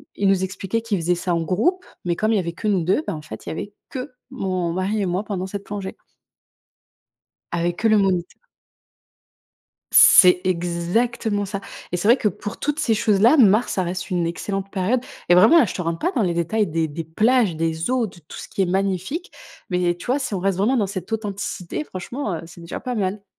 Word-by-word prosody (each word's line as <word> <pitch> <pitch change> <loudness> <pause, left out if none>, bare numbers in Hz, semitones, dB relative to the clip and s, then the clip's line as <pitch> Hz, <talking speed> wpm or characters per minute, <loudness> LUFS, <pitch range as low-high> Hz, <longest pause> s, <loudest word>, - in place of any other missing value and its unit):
ils 200 - +1
nous 195 -1 +3
expliquaient 195 +3 -2
qu'ils 220 -4 -1
faisaient 175 +2 +1
ça 175 0 -2
en 170 - +1
groupe 320 - 0 0.2
mais 175 -1 -1
comme 215 +1 +1
il - - +3
y - - +3
avait 170 -2 -2
que 215 +6 -5
nous 195 -5 +2
2, 185 - +2
bah, - - -2
en 155 - -7
fait 110 -7 -10
il - - -5
y - - -3
avait 200 +5 -6 0.2
que 260 +2 -6 0.2
mon 185 -8 -2
mari 195 +4 -1
et - - 0
moi 185 +2 -1
pendant 190 -3 -4
cette 200 +1 -6
plongée. 200 -2 -6 1.6
Avec 170 +1 -1
que 225 - +2
le 215 -1 +5
moniteur. 185 -3 0 1.5
C'est 180 -2 +8
exactement 185 +5 0
ça! 200 0 -4 0.3
Et - - +1
c'est 180 +4 -1
vrai 240 - +7
que, 220 - +1
pour 205 +1 -7
toutes 295 0 -2
ces 225 - +2
choses-là, 215 +6 +4
mars, 220 -3 +4
ça 190 - 0
reste 180 +2 -4
une 175 -2 0
excellente 195 +3 -4
période. 195 +7 0 0.3
Et 175 - +6
vraiment 190 - +7
là, 300 - +5
je - - -5
te 180 - -3
rentre 165 0 -2
pas 355 - 0
dans 235 - +1
les 175 -3 0
détails 205 +6 0
des 160 -1 -1
des 160 +3 -5
plages, 215 +4 +2
des 160 +3 -2
eaux, 255 -3 +1
de 180 - -13
tout 155 - -12
ce - - -8
qui 195 - -1
est - - +1
magnifique, 195 - -2 0.4
mais 180 -1 +1
tu 175 - -11
vois? 255 +3 +1
Si 255 -6 -3
on 190 - -2
reste 195 0 0
vraiment 225 +7 +2
dans 210 -5 +1
cette 190 +2 -6
authenticité, 205 - -4
franchement, 210 +1 -5
heu, 165 - -4
c'est 170 +1 -13
déjà 170 -1 -6
pas 250 -1 -4
mal. 200 -1 -2
195 Hz, 225 wpm, -22 LUFS, 175-220 Hz, 1.6 s, C'est